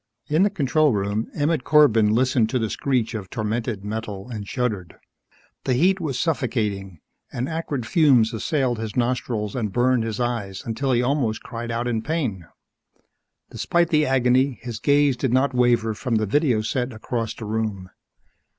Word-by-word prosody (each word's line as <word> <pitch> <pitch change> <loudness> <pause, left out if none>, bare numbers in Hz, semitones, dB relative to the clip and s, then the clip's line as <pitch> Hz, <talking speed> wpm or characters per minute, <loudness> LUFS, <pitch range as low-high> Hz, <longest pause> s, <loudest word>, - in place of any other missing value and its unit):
In 155 +4 +2
the 205 - +4
control 150 - +2
room, 100 +2 -1
Emmett 150 -1 0
Corbin 120 -9 +5
listened 120 -1 +2
to 130 - 0
the 110 -3 -1
screech 125 -4 0
of 100 -4 -6
tormented 110 -2 -3
metal 105 -2 -5
and 105 -3 -6
shuddered. 105 -9 -3 0.7
The 130 - +2
heat 185 +8 +3
was 140 -6 -2
suffocating, 105 - -2 0.3
and 125 +2 -3
acrid 155 -6 -3
fumes 125 -6 +4
assailed 125 0 0
his 110 -2 -5
nostrils 120 -4 -1
and 110 -5 -2
burned 125 +2 +2
his 115 -1 -4
eyes 115 -6 -3
until 130 +4 -1
he 120 0 +2
almost 125 -5 0
cried 120 0 -6
out 115 +1 -2
in 115 -2 -1
pain. 120 - -3 1.0
Despite 170 -1 +1
the 155 -3 +3
agony, 130 0 +2
his 120 -3 -5
gaze 145 0 +3
did 125 0 -1
not 130 +1 +2
waver 120 -3 +2
from 120 +2 -2
the 110 0 +1
video 125 0 +2
set 125 +2 -2
across 115 0 -3
the 110 - -7
room. 105 -4 -3
120 Hz, 165 wpm, -23 LUFS, 110-135 Hz, 1.0 s, Corbin